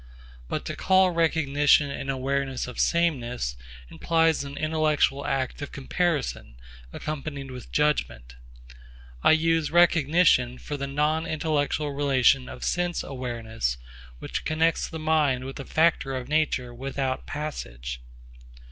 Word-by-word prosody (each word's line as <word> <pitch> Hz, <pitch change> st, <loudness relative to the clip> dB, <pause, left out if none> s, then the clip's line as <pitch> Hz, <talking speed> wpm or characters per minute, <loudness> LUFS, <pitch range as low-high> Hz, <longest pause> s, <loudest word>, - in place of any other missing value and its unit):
But -, -, -3 dB
to -, -, -4 dB
call 190 Hz, -1 st, +4 dB
recognition 150 Hz, -3 st, +3 dB
an 135 Hz, -, -5 dB
awareness 135 Hz, 0 st, -1 dB
of 125 Hz, -, -8 dB
sameness 125 Hz, -, 0 dB, 0.3 s
implies 165 Hz, -, +1 dB
an 140 Hz, 0 st, -8 dB
intellectual 155 Hz, -3 st, +1 dB
act 135 Hz, +1 st, -2 dB
of 145 Hz, -, -6 dB
comparison 140 Hz, -, -2 dB, 0.4 s
accompanied 140 Hz, -, -5 dB
with 125 Hz, -1 st, -10 dB
judgment. -, -, 0 dB, 0.9 s
I -, -, +6 dB
use 165 Hz, -1 st, +2 dB
recognition 165 Hz, -6 st, +4 dB
for 145 Hz, -, -6 dB
the 140 Hz, -1 st, -4 dB
non 150 Hz, +3 st, 0 dB
intellectual 150 Hz, -1 st, -1 dB
relation 135 Hz, -2 st, +2 dB
of -, -, -9 dB
sense 175 Hz, -1 st, -1 dB
awareness 115 Hz, -, -3 dB, 0.4 s
which -, -, -5 dB
connects 160 Hz, +1 st, +1 dB
the 160 Hz, -, -6 dB
mind 155 Hz, -5 st, +1 dB
with 135 Hz, +2 st, -7 dB
a 135 Hz, -, -6 dB
factor 160 Hz, -4 st, +2 dB
of 125 Hz, -1 st, -5 dB
nature 145 Hz, -5 st, 0 dB
without 135 Hz, +1 st, -3 dB
passage. 65 Hz, -, -5 dB
145 Hz, 125 wpm, -26 LUFS, 130-155 Hz, 0.9 s, I